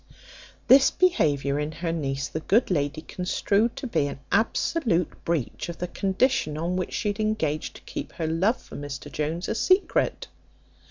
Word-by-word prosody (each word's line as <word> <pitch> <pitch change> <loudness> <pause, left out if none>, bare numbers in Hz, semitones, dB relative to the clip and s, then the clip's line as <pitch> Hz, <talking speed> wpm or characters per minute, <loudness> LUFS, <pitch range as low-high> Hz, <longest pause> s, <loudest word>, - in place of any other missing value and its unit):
This 270 +1 +8
behaviour 145 - +2
in 150 +1 -3
her 165 +1 -3
niece 135 -4 -2
the 160 - -4
good 200 +7 +2
lady 150 -2 0
construed 200 +6 0
to 270 - -6
be 150 - +1
an 140 - -6
absolute 220 - +1
breach 165 0 -2
of 170 - -6
the 180 - -3
condition 190 - 0
on 170 +3 -1
which 185 -1 -2
she 210 - 0
had 205 - -3
engaged 185 -9 -1
to - - -12
keep - - -6
her 165 - -3
love 180 +9 +1
for - - -13
Mr 145 0 -6
Jones 155 +5 -2
a - - 0
secret. 370 - +2
170 Hz, 170 wpm, -26 LUFS, 150-215 Hz, -, This